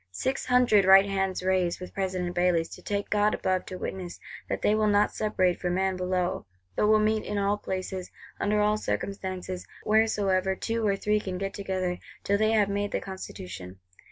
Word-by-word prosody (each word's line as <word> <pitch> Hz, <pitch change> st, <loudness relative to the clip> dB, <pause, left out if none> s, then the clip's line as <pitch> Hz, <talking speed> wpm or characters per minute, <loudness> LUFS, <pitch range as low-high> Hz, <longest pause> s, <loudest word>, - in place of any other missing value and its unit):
Six 260 Hz, -, -2 dB
hundred 250 Hz, -5 st, +5 dB
right 195 Hz, +1 st, +8 dB
hands 195 Hz, -2 st, -1 dB
rise 185 Hz, -2 st, +1 dB
with 180 Hz, -, -8 dB
President 185 Hz, -2 st, -2 dB
Bailly's, 175 Hz, -2 st, +2 dB
to -, -, -11 dB
take 205 Hz, 0 st, -3 dB
God 210 Hz, 0 st, +3 dB
above 185 Hz, -1 st, -1 dB
to 185 Hz, -, -6 dB
witness 180 Hz, -1 st, -6 dB, 0.3 s
that -, -, -3 dB
they 210 Hz, -, +4 dB
will 215 Hz, 0 st, +2 dB
not 205 Hz, 0 st, +3 dB
separate 185 Hz, -4 st, +1 dB
for 180 Hz, -, 0 dB
man 190 Hz, +1 st, +1 dB
below, 180 Hz, -, -1 dB, 0.3 s
but 210 Hz, -, +2 dB
will 215 Hz, 0 st, +6 dB
meet 215 Hz, 0 st, +1 dB
in 210 Hz, -, -3 dB
all 200 Hz, 0 st, +2 dB
places, 185 Hz, -1 st, -4 dB, 0.3 s
under 210 Hz, +1 st, +1 dB
all 210 Hz, +1 st, +3 dB
circumstances, 185 Hz, -3 st, -4 dB, 0.2 s
wheresoever 200 Hz, -3 st, +2 dB
two 225 Hz, +2 st, -1 dB
or 200 Hz, -, +2 dB
three 210 Hz, +2 st, +1 dB
can 185 Hz, -3 st, -4 dB
get 195 Hz, +1 st, -3 dB
together, 185 Hz, -2 st, -2 dB, 0.2 s
till 200 Hz, 0 st, +1 dB
they 215 Hz, +1 st, +3 dB
have 210 Hz, -2 st, +4 dB
made 200 Hz, 0 st, -2 dB
the -, -, 0 dB
Constitution. 90 Hz, -, -8 dB
195 Hz, 185 wpm, -27 LUFS, 185-210 Hz, 0.3 s, right